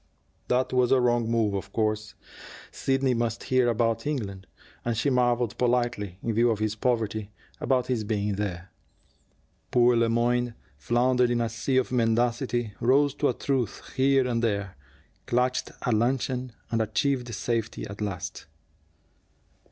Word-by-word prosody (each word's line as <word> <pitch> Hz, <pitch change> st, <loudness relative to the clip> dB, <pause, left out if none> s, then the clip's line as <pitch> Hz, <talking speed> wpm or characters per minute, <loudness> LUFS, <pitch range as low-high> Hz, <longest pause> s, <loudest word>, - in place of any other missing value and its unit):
That 125 Hz, +1 st, +1 dB
was 125 Hz, -1 st, +3 dB
a 135 Hz, -, +5 dB
wrong 120 Hz, -2 st, +2 dB
move, 115 Hz, -3 st, +1 dB
of 100 Hz, -, -4 dB
course. 110 Hz, -1 st, -1 dB, 0.6 s
Sidney 135 Hz, -1 st, +1 dB
must 115 Hz, -1 st, -1 dB
hear 130 Hz, -1 st, +2 dB
about 115 Hz, +3 st, 0 dB
England; 100 Hz, -10 st, -4 dB, 0.4 s
and 120 Hz, -2 st, -1 dB
she 140 Hz, +5 st, +1 dB
marveled 120 Hz, -2 st, +1 dB
politely, 120 Hz, -6 st, 0 dB
in 115 Hz, -, -1 dB
view 120 Hz, +2 st, +3 dB
of 110 Hz, -, +1 dB
his 110 Hz, 0 st, -1 dB
poverty, 110 Hz, -2 st, -1 dB, 0.3 s
about 130 Hz, -2 st, +1 dB
his 125 Hz, -4 st, -1 dB
being 105 Hz, -1 st, -1 dB
there. 95 Hz, -2 st, -4 dB, 1.0 s
Poor 120 Hz, 0 st, +4 dB
Le 115 Hz, 0 st, +3 dB
Moyne 120 Hz, 0 st, +1 dB, 0.2 s
floundered 120 Hz, -, +2 dB
in 120 Hz, 0 st, +1 dB
a 115 Hz, -1 st, 0 dB
sea 115 Hz, +4 st, -1 dB
of 130 Hz, -, +1 dB
mendacity, 120 Hz, -1 st, +1 dB
rose 140 Hz, +3 st, +3 dB
to 145 Hz, 0 st, +1 dB
a -, -, +1 dB
truth 130 Hz, -6 st, -2 dB
here 135 Hz, -1 st, +3 dB
and 115 Hz, -2 st, 0 dB
there, 100 Hz, -4 st, -1 dB, 0.5 s
clutched 125 Hz, +1 st, 0 dB
at 125 Hz, -, +2 dB
luncheon, 125 Hz, +2 st, 0 dB, 0.2 s
and 115 Hz, -1 st, +1 dB
achieved 125 Hz, +3 st, 0 dB
safety 115 Hz, 0 st, -2 dB
at 100 Hz, +1 st, -9 dB
last. 100 Hz, -4 st, -5 dB
120 Hz, 150 wpm, -27 LUFS, 110-125 Hz, 1.0 s, a